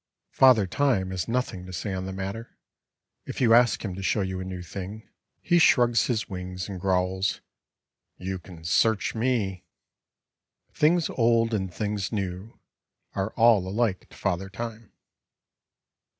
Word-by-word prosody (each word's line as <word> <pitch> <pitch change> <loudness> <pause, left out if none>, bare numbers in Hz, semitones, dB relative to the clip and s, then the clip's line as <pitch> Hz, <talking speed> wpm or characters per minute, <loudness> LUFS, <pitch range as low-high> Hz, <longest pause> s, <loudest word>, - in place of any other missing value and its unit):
Father 125 -6 +6
Time 95 -3 +1
has 90 -3 -3
nothing 115 -6 -2
to - - -8
say 95 +2 -4
on 95 0 -4
the - - -4
matter. 95 +5 -6 0.7
If - - -5
you 115 -3 +5
ask 120 -1 +4
him 95 - -3
to 95 - -7
show 100 +2 +1
you 95 -1 -3
a - - -4
new 95 -1 -6
thing, 100 +5 -7 0.3
he 175 -1 +3
shrugs 120 -7 +4
his 110 -4 -1
wings 90 -1 -6
and 95 -3 -7
growls, 95 +1 0 0.8
"You 95 0 -4
can 85 -3 -13
search 110 +6 +2
me." 110 -6 -1 1.1
Things 165 +2 +3
old 115 -1 +2
and 95 -4 -1
things 105 +2 -3
new 95 0 -4 0.5
are 95 +1 -1
all 115 -5 +4
alike 105 -1 -1
to - - -16
Father 95 +1 -2
Time. 115 +1 -7
100 Hz, 150 wpm, -26 LUFS, 95-115 Hz, 1.1 s, Father